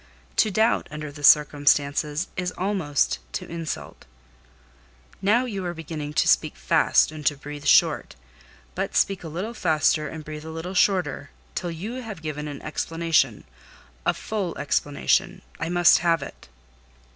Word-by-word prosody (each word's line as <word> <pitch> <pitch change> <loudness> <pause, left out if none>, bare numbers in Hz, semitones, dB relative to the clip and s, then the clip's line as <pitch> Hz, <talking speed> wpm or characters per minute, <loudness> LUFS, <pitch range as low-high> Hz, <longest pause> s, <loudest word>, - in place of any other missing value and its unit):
To 215 - +4
doubt, 220 +3 +2
under 150 -1 -6
the 145 0 -11
circumstances, 145 +1 +3
is 180 0 -2
almost 145 - 0
to - - -4
insult." 165 -2 -6 1.2
"Now 225 +6 +3
you 200 -6 -4
are 175 -1 -4
beginning 155 -2 -6
to - - +2
speak - - +3
fast - - +3
and 155 -1 -8
to 145 - +2
breathe 145 +1 -9
short; - - +4 0.6
but - - -3
speak 195 -2 +1
a - - -6
little 185 +9 -4
faster 155 -5 +1
and 155 +1 -8
breathe 150 0 -7
a 160 - -8
little 165 +3 -6
shorter, 180 -7 +1 0.2
till 175 - -3
you 210 +10 -5
have 215 -8 -8
given 150 -1 -4
an 145 -1 -8
explanation—a 115 - -2
full 200 -6 -3
explanation: 145 0 0 0.2
I 165 - -2
must 175 -1 +5
have 165 -3 +1
it." 140 - -11
160 Hz, 145 wpm, -24 LUFS, 145-180 Hz, 1.2 s, must